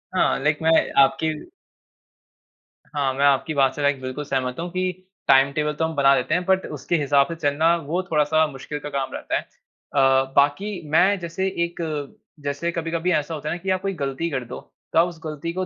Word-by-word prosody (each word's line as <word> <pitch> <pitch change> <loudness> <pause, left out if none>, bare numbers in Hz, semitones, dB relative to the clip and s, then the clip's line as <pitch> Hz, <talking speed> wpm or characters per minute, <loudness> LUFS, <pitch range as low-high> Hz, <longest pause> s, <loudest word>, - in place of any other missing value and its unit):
हाँ, - - +2
लाइक 150 0 +2
मैं 160 0 +3 0.3
आपकी 150 +3 +2 1.7
हाँ, 135 -2 +1
मैं 140 +2 +1
आपकी 140 +3 +2
बात 135 -2 +2
से 145 - -4
लाइक 140 -1 +2
बिल्कुल 130 +3 -5
सहमत 130 0 -2
हूँ 175 +1 -3
कि 185 0 -1 0.4
टाइम-टेबल 140 +3 +3
तो 160 - +2
हम 160 - -3
बना 140 -1 +5
देते 130 +5 -1
हैं 180 +1 +1
बट 190 0 +2
उसके 150 +4 -2
हिसाब 140 -1 +3
से 170 - -5
चलना 160 +2 +2
वो 175 +5 -1
थोड़ा-सा 155 -2 +2
मुश्किल 145 +1 -7
का 145 - -6
काम 135 -2 -3
रहता - - -3
है। - - -2 0.5
अ, 135 -1 +4
बाक़ी 175 +8 +2
मैं 185 +5 +4
जैसे 175 +3 -3 0.2
एक 170 0 -4 0.6
जैसे 145 +4 -2
कभी-कभी 165 +1 -2
ऐसा 155 0 0
होता 150 0 -4
है 170 - -1
ना - - -5
कि 190 - -4
आप 185 0 0
कोई 195 0 -2
गलती 145 +2 -3
कर 130 -4 -2
दो, - - -7 0.3
तो - - +5
आप 170 - +5
उस 170 -2 -9
गलती 155 +1 -4
को 185 0 -2
150 Hz, 205 wpm, -23 LUFS, 140-170 Hz, 1.7 s, बना